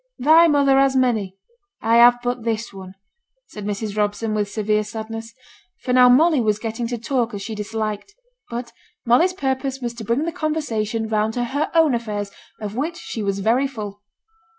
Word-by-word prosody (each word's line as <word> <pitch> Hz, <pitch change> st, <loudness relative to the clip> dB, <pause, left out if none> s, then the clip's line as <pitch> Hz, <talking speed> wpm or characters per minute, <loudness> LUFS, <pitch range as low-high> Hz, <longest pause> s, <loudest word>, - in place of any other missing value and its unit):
'Thy 320 Hz, +5 st, +6 dB
mother 280 Hz, -3 st, +4 dB
has 270 Hz, -1 st, +3 dB
many, 220 Hz, -7 st, 0 dB, 0.4 s
I 230 Hz, +1 st, +3 dB
have 240 Hz, +1 st, +7 dB
but 245 Hz, 0 st, -2 dB
this 225 Hz, -1 st, -2 dB
one,' 190 Hz, -1 st, -10 dB, 0.5 s
said 210 Hz, -, -9 dB
Mrs. 205 Hz, 0 st, -3 dB
Robson, 210 Hz, +1 st, -1 dB
with 210 Hz, -1 st, -1 dB
severe 215 Hz, 0 st, 0 dB
sadness; 225 Hz, +1 st, -7 dB, 0.5 s
for 250 Hz, -, -1 dB
now 250 Hz, 0 st, +7 dB
Molly 300 Hz, +2 st, +5 dB
was 215 Hz, -2 st, +1 dB
getting 225 Hz, +1 st, -4 dB
to 240 Hz, 0 st, -3 dB
talk 235 Hz, -1 st, -1 dB
as 200 Hz, -, -6 dB
she 225 Hz, -, -5 dB
disliked. 215 Hz, -, -4 dB, 0.3 s
But 235 Hz, 0 st, -6 dB, 0.3 s
Molly's 290 Hz, +11 st, +4 dB
purpose 270 Hz, -4 st, -2 dB
was 240 Hz, -2 st, -4 dB
to 235 Hz, -1 st, -8 dB
bring 235 Hz, +7 st, 0 dB
the 335 Hz, -, -2 dB
conversation 230 Hz, -9 st, -2 dB
round 215 Hz, 0 st, 0 dB
to 245 Hz, -, 0 dB
her 285 Hz, +6 st, -2 dB
own 320 Hz, -4 st, +5 dB
affairs, 210 Hz, -4 st, -3 dB, 0.3 s
of 210 Hz, -1 st, -6 dB
which 320 Hz, +7 st, -2 dB
she 225 Hz, -, -6 dB
was 200 Hz, -1 st, -2 dB
very 240 Hz, +7 st, +2 dB
full. 210 Hz, -6 st, -8 dB
230 Hz, 180 wpm, -21 LUFS, 215-265 Hz, 0.5 s, have